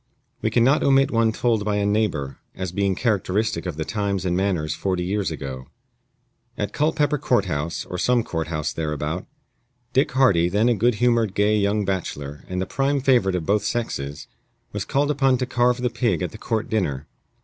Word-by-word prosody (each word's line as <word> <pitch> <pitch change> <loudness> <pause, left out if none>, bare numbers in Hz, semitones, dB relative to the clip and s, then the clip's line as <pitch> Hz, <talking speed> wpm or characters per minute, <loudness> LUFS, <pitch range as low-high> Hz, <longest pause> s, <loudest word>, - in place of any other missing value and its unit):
We 110 - +1
can 115 +1 +3
not 135 +5 +4
omit 135 0 +4
one 115 -1 +3
told 110 -1 0
by 105 0 0
a 100 0 +1
neighbor, 95 - 0 0.2
as 95 -2 -4
being 100 0 0
characteristic 105 -4 0
of 85 -4 -4
the 80 - -2
times 100 -2 -2
and 90 -1 +1
manners 90 -5 0
forty 90 +2 -1
years 95 0 -1
ago: 65 -4 -6 0.9
At 105 -1 -3
Culpepper 150 -1 +1
Court 120 -6 +2
house, 80 -1 -3
or 90 - -5
some 125 +2 +2
court 80 -5 -3
house 75 -2 -2
thereabout, 75 +2 -3 0.7
Dick 135 +2 +2
Hardy, 95 -11 +4
then 105 +6 +2
a - - +4
good 115 +2 +2
humored, 115 -3 +2
gay 105 +1 +3
young 105 0 +1
bachelor, 75 -7 -4
and 90 0 -2
the 95 - -1
prime 135 +7 0
favorite 125 -9 +3
of 85 -3 -2
both 100 +2 +2
sexes, 75 -12 -3 0.5
was - - -3
called 145 +2 +1
upon 135 -3 +3
to 125 - -1
carve 125 -1 +2
the 125 -1 0
pig 115 -8 0
at - - -3
the - - -11
court 110 -2 -2
dinner. 75 -11 -1
100 Hz, 195 wpm, -23 LUFS, 85-120 Hz, 0.9 s, not